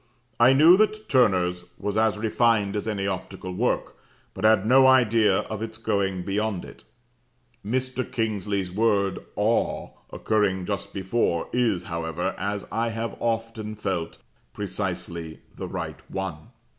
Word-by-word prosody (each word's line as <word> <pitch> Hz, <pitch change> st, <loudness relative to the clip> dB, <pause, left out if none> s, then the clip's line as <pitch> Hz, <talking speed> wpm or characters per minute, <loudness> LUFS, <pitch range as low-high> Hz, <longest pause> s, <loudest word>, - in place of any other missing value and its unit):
I 120 Hz, +3 st, +7 dB
knew 160 Hz, +6 st, +7 dB
that 215 Hz, +1 st, +1 dB
Turner's 90 Hz, -9 st, +3 dB
was 105 Hz, 0 st, -3 dB
as 110 Hz, -1 st, +2 dB
refined 110 Hz, -2 st, +2 dB
as 105 Hz, -, -2 dB
any 100 Hz, -3 st, -1 dB
optical 95 Hz, -1 st, -4 dB
work, -, -, -1 dB, 0.4 s
but 95 Hz, -, -8 dB
had 110 Hz, -2 st, +5 dB
no 130 Hz, +3 st, +6 dB
idea 115 Hz, -6 st, +4 dB
of 110 Hz, -1 st, -6 dB
its 110 Hz, 0 st, -5 dB
going 100 Hz, -4 st, -1 dB
beyond 100 Hz, -1 st, -2 dB
it. -, -, -13 dB, 0.8 s
Mr. 130 Hz, +3 st, -2 dB
Kingsley's 100 Hz, -4 st, -1 dB
word 100 Hz, -1 st, +1 dB, 0.2 s
'awe' 110 Hz, +3 st, 0 dB, 0.2 s
occurring 100 Hz, -4 st, 0 dB
just 100 Hz, 0 st, -3 dB
before, 95 Hz, -3 st, -1 dB
is, 115 Hz, -8 st, +1 dB
however, 85 Hz, +2 st, -3 dB
as 100 Hz, 0 st, -2 dB
I 115 Hz, +1 st, 0 dB
have 115 Hz, +1 st, -4 dB
often 115 Hz, -2 st, -2 dB
felt, 95 Hz, -5 st, -3 dB, 0.4 s
precisely 85 Hz, -2 st, -4 dB
the -, -, -5 dB
right -, -, -5 dB
one. 95 Hz, -5 st, -5 dB
105 Hz, 135 wpm, -25 LUFS, 95-115 Hz, 0.8 s, I